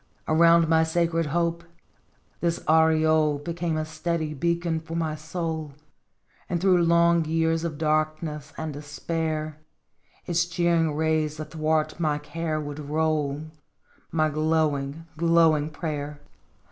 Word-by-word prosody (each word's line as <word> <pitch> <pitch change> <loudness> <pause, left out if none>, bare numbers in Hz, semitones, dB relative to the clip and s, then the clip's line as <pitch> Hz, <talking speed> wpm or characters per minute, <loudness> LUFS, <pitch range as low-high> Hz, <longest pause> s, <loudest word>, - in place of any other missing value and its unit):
Around 165 +1 +5
my 160 0 +4
sacred 165 0 0
hope 170 +2 -1 0.8
this 170 -1 0
aureole 155 -1 +4
Became 165 +1 -3
a 155 - -1
steady 155 0 -2
beacon 170 +2 0
for 165 +1 -8
my 160 -2 -1
soul, 160 -1 -4 0.8
And 175 - 0
through 180 -1 +4
long 170 0 +4
years 165 +1 +1
of 160 -3 -3
darkness 155 -1 -1
and 160 -1 -4
despair 155 +1 -3 0.7
Its 170 0 +1
cheering 170 -3 +1
rays 155 -1 0
athwart 155 0 -1
my 155 -3 +1
care 155 +1 -3
would 145 0 -6
roll, 150 -1 -1 0.7
My 155 -1 +2
glowing, 155 -1 0
glowing 165 -2 +3
prayer 150 -2 -5
160 Hz, 120 wpm, -25 LUFS, 155-165 Hz, 0.8 s, Around